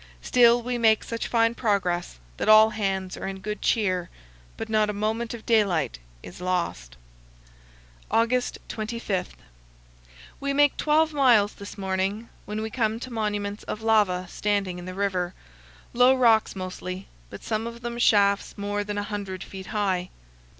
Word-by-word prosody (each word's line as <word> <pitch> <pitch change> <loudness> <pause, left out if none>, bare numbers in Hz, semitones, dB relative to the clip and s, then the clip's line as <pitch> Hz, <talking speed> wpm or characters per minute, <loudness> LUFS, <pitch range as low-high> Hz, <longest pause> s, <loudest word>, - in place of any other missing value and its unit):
Still, 240 -1 +5
we 245 0 -2
make 220 -2 +4
such 230 0 -4
fine 230 -1 +2
progress 185 - -1 0.2
that - - -1
all 215 +1 +8
hands 195 -3 -2
are - - -5
in 195 0 -5
good 210 +2 -5
cheer, 185 -5 +1 0.5
but - - -5
not 215 -1 +2
a - - -1
moment 220 +3 -2
of 225 - -12
daylight 190 - +1 0.2
is - - -11
lost. 170 - -2 1.1
August 245 +2 +1
25. 215 -4 -3 1.0
We 280 0 -1
make 290 0 +4
12 310 +1 +2
miles 240 -8 +4
this 200 +1 -10
morning, 195 +3 -2 0.2
when 210 +1 -4
we 220 - -4
come 225 -2 0
to 255 0 -7
monuments 205 -2 -2
of 215 - -5
lava 205 -5 +2
standing 195 -1 -1
in 175 - -9
the 185 0 -7
river, 185 -2 -1 0.6
low 250 +2 +5
rocks 230 -5 +3
mostly, 185 0 -6 0.2
but - - -10
some 220 +1 -2
of 235 0 -8
them 240 0 -5
shafts 200 -3 +3
more 205 0 -2
than 205 0 -4
a 205 - -1
hundred 200 -3 -5
feet 190 -1 -9
high. 190 -4 -1
210 Hz, 155 wpm, -25 LUFS, 190-230 Hz, 1.1 s, all